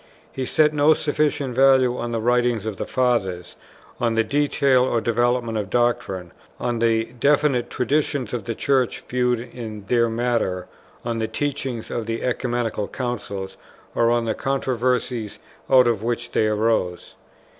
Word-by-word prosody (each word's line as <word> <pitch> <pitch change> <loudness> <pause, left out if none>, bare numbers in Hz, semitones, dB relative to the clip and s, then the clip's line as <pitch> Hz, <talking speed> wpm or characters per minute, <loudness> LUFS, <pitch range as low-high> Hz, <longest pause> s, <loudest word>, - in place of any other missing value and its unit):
He 130 - -4
set 155 -1 +3
no 150 +1 +4
sufficient 145 -3 0
value 130 -1 +4
on 120 -1 -4
the 115 - -1
writings 120 -1 +1
of 110 -3 -4
the - - -4
Fathers, 110 -9 0 0.4
on 115 -2 +1
the 115 - +3
detail 140 0 +2
or 125 -2 +1
development 120 0 0
of 100 -3 -4
doctrine, 120 -7 0 0.3
on 120 -1 -1
the 115 0 +1
definite 140 -3 +2
traditions 140 -2 -1
of 115 -5 -3
the 115 - -3
Church 130 -2 +1
viewed 125 -1 +1
in 115 -3 -8
their 115 -1 +3
matter, 115 -6 -1 0.4
on 115 -1 -2
the 110 - -1
teaching 130 -1 -3
of 115 -2 -3
the 115 0 -3
Ecumenical 120 -4 -1
Councils, 100 -6 -5 0.4
or 115 0 +3
on 120 0 +1
the 110 - 0
controversies 125 -4 -1 0.3
out 130 -2 +7
of 115 -4 +1
which 120 +1 -3
they 110 - +2
arose. 105 -4 0
120 Hz, 155 wpm, -22 LUFS, 115-130 Hz, 0.4 s, out